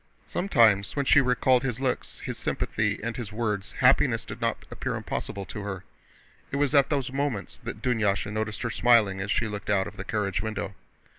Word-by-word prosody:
Sometimes 115 - +3
when 140 -1 0
she 145 - +6
recalled 125 0 +3
his 125 -2 -2
looks, 130 -2 -2
his - - -4
sympathy, - - -1
and 115 0 -3
his 115 -3 -5
words, 105 -3 -2
happiness - - +3
did - - -8
not - - -1
appear - - -3
impossible 100 -1 -4
to 105 +4 -7
her. 95 -2 -5 0.7
It - - -4
was 145 0 +1
at 140 -2 +5
those 135 -3 -1
moments 140 -7 -2
that 105 - -7
Dunyásha 105 -5 +1
noticed 110 0 -3
her 115 - -1
smiling 110 -5 +4
as 100 - -4
she 110 +4 +1
looked 105 -1 -6
out 95 -2 +3
of 105 - -9
the 95 - -4
carriage 100 -2 -1
window. 110 -2 -4
110 Hz, 195 wpm, -27 LUFS, 100-125 Hz, 0.7 s, she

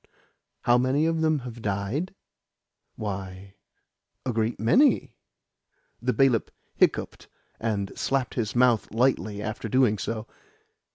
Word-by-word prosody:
"How 120 0 +4
many 130 +5 +2
of 165 0 +1
them 155 -1 +3
have 120 -1 -8
died? 105 - -2 0.8
Why, 95 -2 -6 0.7
a 125 - -1
great 110 +1 -1
many." 255 - +3 0.9
The - - +1
bailiff 135 -5 +2 0.2
hiccoughed, - - 0 0.3
and 105 -3 -2
slapped 135 -2 -1
his 115 -3 -2
mouth 120 -2 +3
lightly 110 -3 +1
after 110 0 -4
doing 120 -4 +3
so. 110 +1 -3
115 Hz, 115 wpm, -26 LUFS, 105-135 Hz, 0.9 s, How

